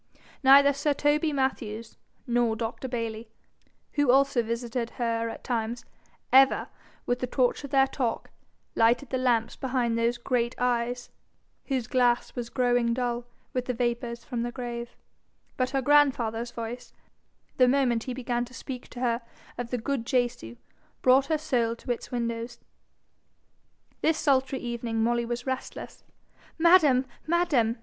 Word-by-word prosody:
Neither 280 +1 +7
sir 290 +1 0
Toby 300 +2 +2
Mathews, 230 -5 -2 0.3
nor 240 -2 +1
Dr. 230 +3 -4
Bayly, 230 -2 -4 0.6
who 290 -3 +1
also 270 -1 +4
visited 235 +1 -3
her 230 -1 -1
at - - -8
times, 235 -1 -2 0.5
ever, 270 0 +5 0.4
with 245 0 0
the 250 - -2
torch 250 +2 +1
of 280 - -6
their 270 -1 +4
talk, 255 -3 -3 0.4
lighted 240 +4 +2
the 260 - 0
lamps 235 -3 +1
behind 250 -3 -1
those 235 +1 +1
great 240 0 -1
eyes, 245 0 -1 0.6
whose 260 -4 -1
glass 245 0 +1
was 240 -1 -4
growing 245 -2 +1
dull 240 -1 -2 0.3
with 250 -1 -1
the 250 - -2
vapours 235 0 -2
from 235 0 -4
the 240 +1 -2
grave; 240 -1 -6 0.6
but 255 0 0
her 270 -1 -1
grandfather's 245 -5 +3
voice, 240 +1 -7 0.6
the 255 - +6
moment 250 -3 +2
he 255 - -3
began 240 -1 -1
to 250 +1 -14
speak 255 -3 -7
to 245 - -9
her 235 -1 +1 0.3
of 240 -1 -5
the 250 - -1
good 240 0 -3
Jesu, 240 - -1 0.5
brought 265 +2 +5
her 315 - +1
soul 240 -6 0
to 245 - -5
its 240 - -4
windows. 235 0 -3 1.4
This 320 0 +2
sultry 270 -3 +2
evening 235 -2 -2
Molly 235 +1 +1
was 240 0 -4
restless. 260 0 -5 0.5
'Madam! 320 -6 +5 0.2
madam!' 310 -10 +2
245 Hz, 145 wpm, -27 LUFS, 235-265 Hz, 1.4 s, Neither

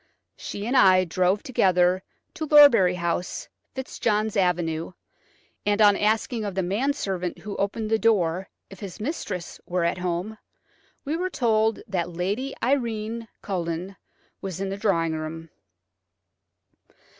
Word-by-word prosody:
She 205 - -6
and 245 +4 -1
I 185 -5 +6
drove 185 +3 +1
together 185 -6 +3 0.3
to 320 -4 -4
Lorbury 255 -12 +7
House, 170 0 -2 0.3
Fitzjohn's 220 -5 -1
Avenue, 175 -3 0 0.7
and 205 0 +1
on 205 -2 +7
asking 220 +2 0
of 200 -3 -4
the 190 - 0
manservant 195 - -1
who 205 -1 -7
opened 215 +2 -2
the 220 - +3
door 190 -5 +1 0.2
if 195 - -11
his 195 -4 -8
mistress 210 - -4
were 180 -1 0
at 170 +2 0
home, 180 +4 -3 0.7
we 295 +3 -1
were 365 +2 -1
told 225 - +1
that 180 -4 -2
Lady 200 +11 -2
Irene 230 -3 -1 0.2
Culledon 180 0 -3 0.5
was 190 -2 -5
in 195 0 -2
the 195 - -3
drawing 165 -6 +1
room. 160 +1 -6
195 Hz, 135 wpm, -25 LUFS, 180-220 Hz, 0.7 s, Lorbury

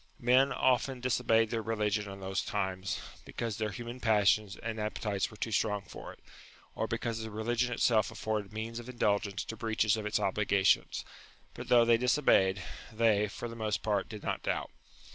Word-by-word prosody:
Men 130 +3 +4
often 130 0 +1
disobeyed 115 -3 +2
their 115 -2 -1
religion 105 -2 -1
in 95 0 -9
those 95 0 -1
times, 95 +1 -2 0.2
because 115 -3 -4
their 110 -1 0
human 120 +5 -7
passions 105 -3 +3
and 115 -1 -5
appetites 105 -2 -2
were 110 - -13
too 115 - -3
strong 105 -2 0
for - - -9
it, - - -15 0.6
or - - -2
because 115 -1 -2
the 110 - -5
religion 120 +3 -1
itself 115 -3 +2
afforded 105 -2 -3
means 110 +2 -5
of 120 +1 -9
indulgence 100 -5 0
to 115 - -6
breaches 110 -1 +1
of 105 -1 -3
its 105 - +1
obligations; 100 0 +2 0.5
but 120 0 -8
though 120 -1 +6
they 115 0 +5
disobeyed, 115 -7 +3 0.3
they, 110 -2 +3
for 110 +4 -6
the 115 - -8
most 110 -2 -2
part, 105 -3 0
did 105 -2 -8
not - - -2
doubt. - - -2
110 Hz, 180 wpm, -31 LUFS, 105-115 Hz, 0.6 s, though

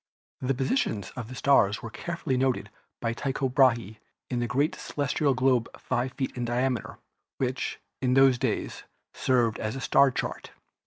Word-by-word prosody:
The 130 +1 0
positions 130 - -1
of 120 -4 -5
the 130 - -8
stars 110 -7 +3
were 115 - -6
carefully 170 -4 -3
noted 130 0 0 0.3
by 115 -1 0
Tycho 135 +2 -1
Brahe 120 -5 +3 0.3
on 120 - 0
a 120 - 0
great 140 +6 +1
celestial 145 -1 0
globe 130 -2 +2
5 130 +2 -1
feet 130 - -3
in 125 - -3
diameter, 120 0 -1 0.4
which, 130 0 -2 0.2
in 125 -1 +2
those 135 -2 +6
days, 125 -5 -2 0.3
served 120 -3 +1
as 110 +2 -3
a - - -4
star 140 +1 +5
chart. 125 - -4
130 Hz, 160 wpm, -27 LUFS, 120-135 Hz, 0.4 s, those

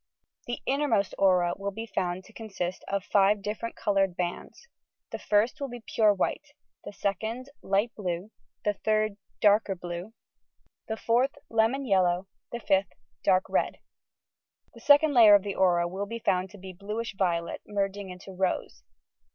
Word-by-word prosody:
The 240 - -4
innermost 265 -8 +1
aura 180 -3 +4
will 200 0 -3
be 225 +3 -6
found 185 -3 -2
to 220 - -18
consist 195 -5 -5
of 200 -1 -1
five 200 +1 +3
different 220 +3 -4
coloured 195 -3 +1
bands. 180 - -5 0.4
The - - -5
first 215 +7 +1
will 280 - -1
be 245 -2 -9
pure 215 -2 +3
white, 200 - -2 0.3
the - - -7
second 220 +7 -3
light 200 +4 0
blue, 185 0 -4 0.3
the 210 - +2
third 215 0 0 0.2
darker 205 -1 +4
blue, 175 +4 -7 0.7
the 220 - -3
fourth 245 +5 +1 0.2
lemon 230 +5 +2
yellow, 185 -3 +2 0.2
the 235 - -4
fifth 195 -4 +1 0.3
dark 185 -1 +4
red. - - 0 1.0
The - - -13
second 290 +1 +5
layer 220 -5 +8
of 200 - +3
the 200 -1 -3
aura 175 -2 +3
will 195 +3 -4
be 230 +2 -5
found 185 -4 0
to 205 - -13
be 190 -1 -9
bluish 210 +5 -5
violet, 170 -3 -1
merging 200 -1 -2
into 180 +1 -10
rose. 180 - -2
200 Hz, 160 wpm, -28 LUFS, 185-225 Hz, 1.0 s, layer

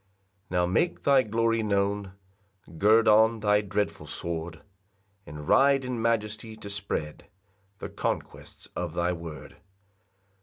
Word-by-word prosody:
2 90 - -4
Now 90 0 +3
make 95 - 0
thy 140 -2 +5
glory 115 0 +1
known, 100 -2 -1 0.7
Gird 110 +2 +5
on 110 +1 +5
thy 105 -1 +3
dreadful 105 0 -3
sword, 80 -1 -5 0.6
And 75 0 -8
ride 135 -1 +4
in 125 -2 -3
majesty 110 -1 -1
to 100 -2 -8
spread 100 -6 -4 0.5
The - - -7
conquests - - -4
of 85 -2 -4
thy 85 +1 +1
word. 85 -2 -9
105 Hz, 125 wpm, -27 LUFS, 90-115 Hz, 0.7 s, thy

